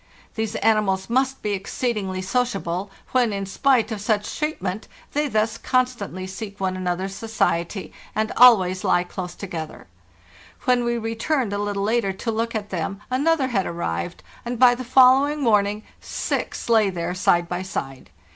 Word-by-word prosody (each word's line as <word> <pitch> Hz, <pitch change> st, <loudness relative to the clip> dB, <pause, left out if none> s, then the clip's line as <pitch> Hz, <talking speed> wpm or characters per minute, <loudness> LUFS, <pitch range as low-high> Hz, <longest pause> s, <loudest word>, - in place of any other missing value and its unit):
These 220 Hz, -1 st, -3 dB
animals 210 Hz, -2 st, +1 dB
must 265 Hz, +2 st, +1 dB
be 210 Hz, -, -1 dB
exceedingly 195 Hz, -1 st, -2 dB
sociable, 195 Hz, -4 st, -1 dB, 0.2 s
when, 245 Hz, -3 st, +3 dB
in 195 Hz, -1 st, -3 dB
spite 250 Hz, +4 st, +2 dB
of 215 Hz, -2 st, -4 dB
such 210 Hz, 0 st, -1 dB
treatment, 215 Hz, -, -3 dB, 0.3 s
they 295 Hz, +1 st, +1 dB
thus 220 Hz, -2 st, 0 dB
constantly 245 Hz, -8 st, -1 dB
seek 200 Hz, +2 st, -7 dB
one 190 Hz, -1 st, -1 dB
another's 185 Hz, +1 st, -2 dB
society, 195 Hz, -4 st, -1 dB, 0.2 s
and 220 Hz, 0 st, 0 dB
always 190 Hz, -7 st, +6 dB
lie 175 Hz, -, +3 dB
close 180 Hz, -1 st, -6 dB
together. 165 Hz, -5 st, -7 dB, 0.8 s
When 250 Hz, -2 st, +3 dB
we 235 Hz, 0 st, 0 dB
returned 225 Hz, +1 st, -1 dB
a 205 Hz, -, -1 dB
little 205 Hz, -1 st, -2 dB
later 215 Hz, -2 st, +1 dB
to 225 Hz, +4 st, -3 dB
look 230 Hz, +1 st, -2 dB
at 210 Hz, -1 st, -4 dB
them 190 Hz, +2 st, -3 dB
another 280 Hz, +1 st, +2 dB
had 195 Hz, -6 st, 0 dB
arrived, 85 Hz, -, -4 dB, 0.2 s
and 240 Hz, 0 st, -4 dB
by 245 Hz, 0 st, +7 dB
the 250 Hz, +1 st, -5 dB
follow 260 Hz, +2 st, +6 dB
ing 295 Hz, 0 st, -3 dB
morning 210 Hz, -2 st, +2 dB, 0.2 s
six -, -, -3 dB
lay 220 Hz, -3 st, +4 dB
there 175 Hz, -1 st, -3 dB
side 175 Hz, -1 st, +2 dB
by 175 Hz, +1 st, -3 dB
side. 135 Hz, -8 st, -5 dB
210 Hz, 160 wpm, -23 LUFS, 190-245 Hz, 0.8 s, by